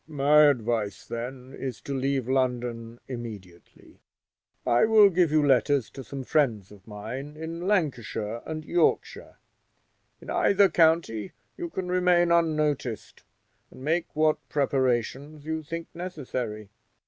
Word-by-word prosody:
"My 150 0 +5
advice, 115 -6 -1
then, 125 +2 -6
is 130 -6 -5
to 140 - -5
leave 135 -2 -1
London 120 -3 -1
immediately. 105 -9 -10 0.7
I 120 - +3
will 215 -2 +6
give 175 -2 +3
you 150 0 +3
letters 135 -1 +2
to 135 - -9
some 135 +3 -7
friends 120 -10 0
of 100 0 -16
mine 125 +8 -7
in 165 +3 -5
Lancashire 120 - -1
and 155 -1 -5
Yorkshire; 170 0 0 0.8
in - - -8
either 200 -1 +4
county 160 - +2 0.2
you 345 -1 -5
can 190 - -4
remain 180 -1 +3
unnoticed, 150 -8 0 0.5
and 130 - -13
make 165 +4 0
what 155 0 +2
preparations 135 +2 -1
you 160 0 -2
think 165 +2 -6
necessary. 125 - -5
140 Hz, 125 wpm, -26 LUFS, 120-160 Hz, 0.8 s, will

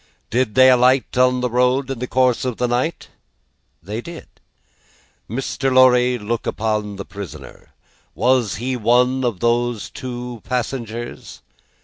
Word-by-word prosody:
"Did 120 -3 0
they 130 0 +7
alight 125 +1 +3
on 125 0 +3
the 125 - 0
road 125 +2 +1
in 130 - -5
the 125 - -3
course 130 -1 +2
of 125 -3 -3
the 125 - 0
night?" 125 +7 -2 0.7
"They 105 +6 -5
did." 170 +4 -9 1.0
"Mr. 135 +3 -2
Lorry, 125 -1 +5
look 115 +1 -4
upon 105 -2 -2
the 100 - -7
prisoner. 100 -3 -10 0.4
Was 120 -1 +2
he 125 +4 -3
one 125 +3 +2
of 120 -7 -2
those 120 -3 0
two 125 -2 -7
passengers?" 120 -2 -5
125 Hz, 135 wpm, -20 LUFS, 115-130 Hz, 1.0 s, they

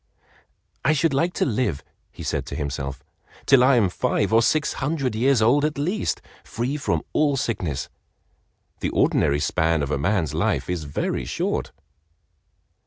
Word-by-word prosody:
"I 155 - +4
should 155 0 +1
like 165 +6 +1
to - - 0
live," 110 - -1 0.3
he - - -10
said - - -2
to - - -5
himself, 70 -1 -4 0.4
"till 135 -3 +6
I 130 +1 +5
am 110 -5 +4
five 90 - 0
or 115 - +6
six 150 +6 +1
hundred 135 -3 -1
years 120 +1 +3
old 135 +6 +4
at 150 -1 0
least, 180 +9 -1 0.2
free 125 +5 -3
from 145 - -1
all 145 -2 +2
sickness. 85 - -2 0.9
The - - -1
ordinary 70 -1 +2
span 80 +1 +1
of 70 - -3
a 70 - 0
man's 90 -1 0
life - - 0
is 85 -4 -3
very 70 - -2
short." - - -2
115 Hz, 160 wpm, -23 LUFS, -, 0.9 s, till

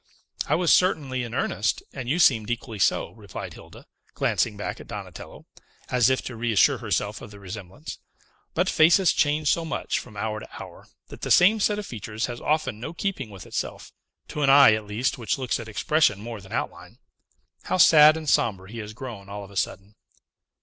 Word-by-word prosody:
"I - - +2
was 175 -1 +3
certainly 145 -8 +2
in 120 0 -5
earnest, 110 -5 -1
and 130 -3 -6
you 155 - +1
seemed 115 -11 +4
equally 120 -2 -4
so," 85 - +1
replied 105 -4 -9
Hilda, - - -14 0.3
glancing 105 -3 0
back 105 - -5
at - - -12
Donatello, - - -9 0.4
as 125 -1 +3
if 130 - 0
to 120 - -6
reassure 115 -3 +2
herself - - -2
of - - -9
the 100 -1 -13
resemblance. 95 -1 -9 0.6
"But - - +1
faces 170 +3 +4
change 150 0 +2
so 170 - 0
much, 160 -1 -2
from 110 -4 -12
hour 110 +1 -3
to - - -11
hour, - - -11 0.2
that - - -11
the - - -4
same 210 +5 +6
set 210 0 +1
of 210 - -5
features 110 - -4
has 120 -1 -7
often 155 -8 -1
no 155 +8 -6
keeping 170 - -3
with 95 -4 -11
itself; - - -5 0.4
to 150 - -4
an 140 - +3
eye, 140 -4 +8
at 110 -1 -2
least, 115 +5 -1
which 115 - -1
looks 130 -2 -2
at 115 - -7
expression 110 -1 +2
more 115 0 -7
than 95 - -15
outline. - - -5 0.7
How - - 0
sad 155 -3 +7
and 160 -1 -7
sombre 100 -7 +1
he 115 - -7
has 105 -1 -7
grown 110 -5 -9
all 100 0 -6
of 100 - -12
a - - -14
sudden!" 100 +1 -3
120 Hz, 200 wpm, -25 LUFS, 105-150 Hz, 0.7 s, eye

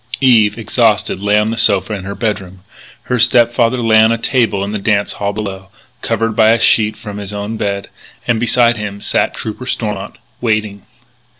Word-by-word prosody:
Eve, 115 -5 +4
exhausted, 110 -4 0
lay 105 +1 +1
on 105 +1 +1
the 115 - -3
sofa 100 -3 +3
in 95 -3 -6
her 100 +1 -5
bedroom. 95 -5 -4 0.4
Her 125 - -2
step 120 0 +4
father 120 +1 +1
lay 110 -1 +5
on 110 +1 +4
a 115 - +1
table 115 -5 0
in 100 - -4
the 105 - -3
dance 100 0 0
hall 100 0 -3
below, 100 -2 -6 0.3
covered 115 -1 -1
by 110 0 +4
a 115 - +1
sheet 110 -1 +2
from 105 -2 -8
his 100 -1 -7
own 105 +2 -4
bed. 100 -2 -3 0.4
And 115 -2 +1
beside 120 0 +2
him 105 -1 -6
sat - - -1
Trooper 110 +4 -6
Stormont, 105 -6 -4 0.2
waiting. 105 -3 -2
110 Hz, 190 wpm, -15 LUFS, 100-115 Hz, 0.4 s, lay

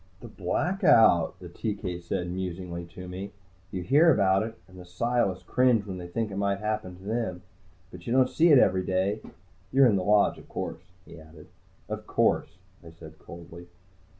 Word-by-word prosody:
"The 120 - -10
Blackout," 115 - +2
the 90 - -9
TK 90 -1 -5
said 90 +1 -3
musingly 90 -1 -5
to 90 +2 -11
me. 95 +3 -7 0.4
"You 95 -2 -5
hear 150 - +5
about 95 -4 +3
it, 115 +1 -5
and 95 -1 -15
the - - -9
Psiless 95 +2 -1
cringe 125 -5 +2
when 95 -2 -6
they 90 - -7
think 105 +4 -3
it 95 - -6
might 100 -1 0
happen 105 -3 -3
to 95 - -16
them. 105 -4 -3 0.5
But 90 -1 -12
you - - -2
don't 130 0 +4
see 165 +6 +2
it 145 - +8
every 95 -6 +3
day. 95 +3 -1 0.5
You're 135 +1 +5
in 110 -5 +4
the 95 - -2
Lodge, 105 +2 +3
of - - -17
course?" 80 - -5 0.2
he - - -13
added. 80 0 -15 0.4
"Of - - -6
course," - - 0 0.3
I 85 - -11
said 80 -1 -14
coldly. 85 0 -12
95 Hz, 185 wpm, -27 LUFS, 90-110 Hz, 0.5 s, it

